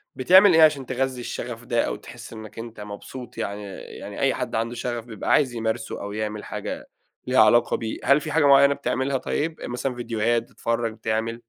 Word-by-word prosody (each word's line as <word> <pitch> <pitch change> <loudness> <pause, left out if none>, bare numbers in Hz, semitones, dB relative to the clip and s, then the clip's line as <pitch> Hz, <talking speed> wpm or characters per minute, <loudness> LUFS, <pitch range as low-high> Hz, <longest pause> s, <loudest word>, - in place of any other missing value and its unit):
بتعمل 185 +7 +7
إيه 160 - +6
عشان 145 -4 +4
تغذي 130 0 -2
الشغف 120 0 -6
ده 120 -2 +1
أو - - -2
تحس - - -11
إنك 110 0 -10
أنت 115 -1 -8
مبسوط، 115 +4 -9
يعني، 105 -2 -3 0.2
يعني - - -9
أي - - +2
حد - - -4
عنده 115 +2 -1
شغف 120 -1 -4
بيبقى 115 -3 -4
عايز 130 -5 +3
يمارسه 110 0 -3
أو 100 0 -5
يعمل 105 0 -4
حاجة - - -6 0.4
ليها 130 - +3
علاقة 120 +2 +4
بيه. 110 -1 -4
هل 140 +2 +4
فيه 155 - -5
حاجة 155 -1 +3
مُعيّنة 140 0 +7
بتعملها 135 -1 -1
طيب، 160 +5 -2
مثلًا 125 +1 -3
فيديوهات 115 -1 0
بتتفرج، 115 -1 -2
بتعمل؟ 110 +1 -2
120 Hz, 190 wpm, -24 LUFS, 110-135 Hz, 0.4 s, بتعمل